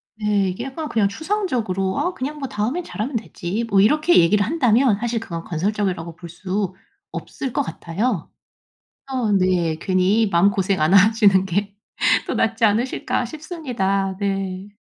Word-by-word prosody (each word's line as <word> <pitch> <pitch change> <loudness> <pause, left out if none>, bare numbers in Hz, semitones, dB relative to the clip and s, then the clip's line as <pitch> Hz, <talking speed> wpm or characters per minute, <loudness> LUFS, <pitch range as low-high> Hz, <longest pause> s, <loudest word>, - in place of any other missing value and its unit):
네. 210 -3 +1
이게 190 +7 -5
약간 295 +3 -5
그냥 215 -3 +2
추상적으로 225 - -2
"아 360 - 0
그냥 295 +1 -5
뭐 275 - -3
다음에는 225 +12 -2
잘하면 245 -2 -4
되지." 215 -1 -3
뭐 200 -2 +3
이렇게 305 - +4
얘기를 200 +4 +4
한다면 250 -5 +3
사실 235 0 -1
그건 170 -7 -6
건설적이라고 180 -1 -2
볼 170 0 -10
수 190 +2 -3 0.4
없을 265 -3 -5
것 - - +1
같아요. 170 +4 -3 0.8
어 250 -5 0
네. 185 -4 +2
괜히 190 +5 +2
마음고생 190 +1 +2
안 155 +4 +3
하시는 200 -1 +5
게 200 +2 -2 0.5
더 - - -2
낫지 225 +1 0
않으실까 235 +3 0
싶습니다. 240 - -2
네. 195 -1 -2
205 Hz, 315 characters per minute, -21 LUFS, 190-245 Hz, 0.8 s, 하시는